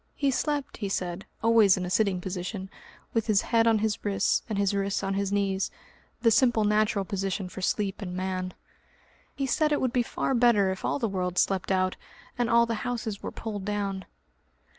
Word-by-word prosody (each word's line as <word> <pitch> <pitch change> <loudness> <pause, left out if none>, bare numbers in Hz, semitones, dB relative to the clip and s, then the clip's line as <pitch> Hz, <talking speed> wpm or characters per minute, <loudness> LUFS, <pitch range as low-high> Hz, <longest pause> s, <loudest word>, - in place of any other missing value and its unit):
He 280 -2 +1
slept, 290 +1 -2
he 205 -3 -3
said, 180 0 -3 0.2
always 225 -4 +5
in 185 - -2
a - - -4
sitting 195 -3 +2
position, 190 +1 -5 0.4
with 225 -1 0
his 210 -3 +3
head 230 -1 +3
on 225 -1 +5
his 215 0 -1
wrists, 200 -2 +1
and 215 - -2
his 200 0 +1
wrists 200 0 -1
on 195 0 -1
his 200 0 -1
knees 195 -1 0 0.5
the 230 - +5
simple 240 -2 +4
natural 210 -1 +2
position 195 0 -2
for 185 +1 -8
sleep 200 +2 -1
in 180 -2 -5
man.... 185 0 -3 0.8
He 275 - -1
said 300 +4 +1
it 295 - +2
would 255 -2 0
be 250 - +3
far 240 - -2
better 230 -6 +4
if 190 - -6
all - - 0
the 240 -5 0
world 180 -2 -2
slept 190 0 +1
out, 185 0 +1 0.4
and 240 -2 0
all 235 0 +5
the 230 -2 -3
houses 220 -4 -3
were - - -4
pulled 210 -3 -5
down. 200 -2 -2
200 Hz, 200 wpm, -27 LUFS, 190-230 Hz, 0.8 s, always